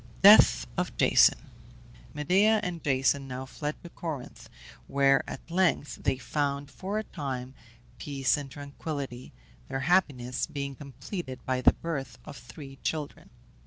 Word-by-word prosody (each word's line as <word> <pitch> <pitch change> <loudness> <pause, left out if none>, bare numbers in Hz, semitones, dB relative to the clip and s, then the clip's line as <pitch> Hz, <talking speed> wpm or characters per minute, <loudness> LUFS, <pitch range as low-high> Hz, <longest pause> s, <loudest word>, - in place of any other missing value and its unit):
DEATH 205 +2 +8
OF - - -3
JASON. - - +5 0.7
Medea 195 +9 +3
and 175 -2 -4
Jason 135 0 +1
now 130 0 -5
fled 150 +3 -4
to 175 - -9
Corinth, 155 -7 -7 0.4
where 135 -1 +3
at - - -9
length 175 -4 +1
they - - +1
found, 140 +1 -2
for 195 +3 -4
a 215 - -1
time, 130 -8 -5 0.5
peace 135 -3 +1
and 145 -2 -6
tranquillity, 140 -2 -6 0.4
their 135 - -3
happiness 130 -7 +1
being 140 -3 -4
completed 140 - -7
by 130 -1 0
the - - +6
birth 150 -5 -5
of - - -9
three 135 +3 -11
children. 150 +1 -4
140 Hz, 135 wpm, -28 LUFS, 130-160 Hz, 0.7 s, DEATH